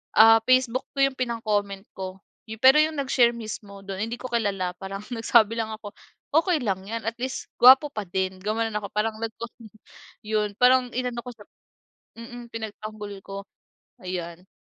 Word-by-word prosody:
ah, 225 Hz, +1 st, +8 dB
facebook 255 Hz, 0 st, +3 dB
ko -, -, -4 dB
yung 270 Hz, -, -7 dB
pinang-comment 210 Hz, -5 st, -1 dB
ko. 190 Hz, 0 st, -6 dB, 0.3 s
Yu 220 Hz, 0 st, -8 dB
pero 265 Hz, +5 st, +7 dB
yung 310 Hz, 0 st, -2 dB
nag-share 255 Hz, -3 st, +3 dB
mismo 215 Hz, -3 st, -8 dB
do'n, 195 Hz, +1 st, -4 dB
hindi 235 Hz, -, -4 dB
ko 255 Hz, -, -5 dB
kilala. 195 Hz, -6 st, -1 dB
Parang 195 Hz, +1 st, -6 dB
nagsabi 225 Hz, -1 st, +3 dB
lang 220 Hz, -1 st, -2 dB
ako. 210 Hz, -2 st, -10 dB, 0.4 s
"Okey 330 Hz, 0 st, +3 dB
lang 190 Hz, -3 st, -1 dB
yan, 230 Hz, +1 st, -4 dB
at 225 Hz, -, -1 dB
least 260 Hz, +2 st, -4 dB
gwapo 260 Hz, +4 st, +8 dB
pa 215 Hz, -, -4 dB
din," 190 Hz, +1 st, -2 dB
gumanon 220 Hz, +1 st, -1 dB
ako. 200 Hz, -, -8 dB
Parang 215 Hz, +1 st, -1 dB
nagko 225 Hz, +1 st, -5 dB, 0.8 s
yun, 210 Hz, -1 st, -1 dB
parang 250 Hz, 0 st, +5 dB
inano 250 Hz, -1 st, -2 dB
ko -, -, -5 dB
siya -, -, -16 dB, 0.8 s
mm, 240 Hz, 0 st, -10 dB
pinagtanggol 215 Hz, -1 st, -6 dB
ko. 195 Hz, -, -8 dB, 0.7 s
Ayan. 180 Hz, -1 st, -6 dB
220 Hz, 165 wpm, -25 LUFS, 200-245 Hz, 0.8 s, ah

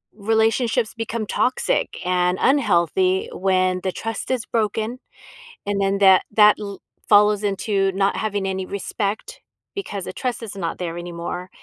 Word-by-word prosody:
relationships 225 Hz, +2 st, +1 dB
become 225 Hz, -1 st, -3 dB
toxic 255 Hz, -, 0 dB
and 180 Hz, 0 st, +1 dB
unhealthy 190 Hz, -, +2 dB
when 185 Hz, -1 st, +1 dB
the 185 Hz, -, 0 dB
trust 225 Hz, 0 st, -5 dB
is 250 Hz, -3 st, -1 dB
broken, 220 Hz, +2 st, -1 dB, 0.7 s
and 200 Hz, -1 st, -1 dB
then 195 Hz, 0 st, +1 dB
that 190 Hz, -2 st, +7 dB
that 210 Hz, 0 st, +6 dB
l 200 Hz, -2 st, -6 dB, 0.3 s
follows 210 Hz, 0 st, +5 dB
into 195 Hz, -1 st, 0 dB
not 195 Hz, +1 st, +1 dB
having 205 Hz, -2 st, -2 dB
any 190 Hz, 0 st, -2 dB
respect, 205 Hz, -, -4 dB, 0.4 s
because 205 Hz, -, -4 dB
the -, -, -5 dB
trust 250 Hz, -2 st, -3 dB
is 210 Hz, -3 st, -7 dB
not 170 Hz, -3 st, -3 dB
there 170 Hz, -2 st, -4 dB
anymore. 175 Hz, +1 st, -6 dB
200 Hz, 145 wpm, -22 LUFS, 185-220 Hz, 0.7 s, that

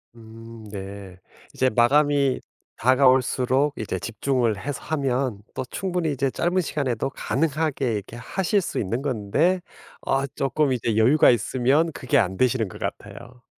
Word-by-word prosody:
음 115 Hz, 0 st, -12 dB
네. 95 Hz, -2 st, -8 dB, 0.3 s
이제 130 Hz, -, +2 dB
마감이 140 Hz, +3 st, +3 dB, 0.4 s
다가올수록 130 Hz, +2 st, +3 dB
이제 105 Hz, -4 st, -3 dB
집중을 115 Hz, +1 st, -1 dB
해서 145 Hz, +3 st, -5 dB
하면 130 Hz, -7 st, -1 dB
또 -, -, -3 dB
충분히 180 Hz, -4 st, -2 dB
이제 135 Hz, -1 st, -1 dB
짧은 180 Hz, +2 st, 0 dB
시간에도 135 Hz, -6 st, -2 dB
가능하게 145 Hz, -4 st, -1 dB
이렇게 105 Hz, +3 st, -6 dB
하실 190 Hz, -, 0 dB
수 -, -, -3 dB
있는 115 Hz, +6 st, -2 dB
건데 145 Hz, -, +1 dB, 0.4 s
아 135 Hz, 0 st, +1 dB
쪼끔 135 Hz, +1 st, +1 dB
이제 115 Hz, -3 st, -1 dB
여유가 125 Hz, +8 st, +5 dB
있으면 130 Hz, +7 st, +2 dB
그게 125 Hz, -5 st, 0 dB
안 95 Hz, -2 st, +1 dB
되시는 120 Hz, -4 st, +1 dB
것 -, -, -11 dB
같아요. 120 Hz, +1 st, -7 dB
130 Hz, 300 characters per minute, -24 LUFS, 115-145 Hz, 0.4 s, 여유가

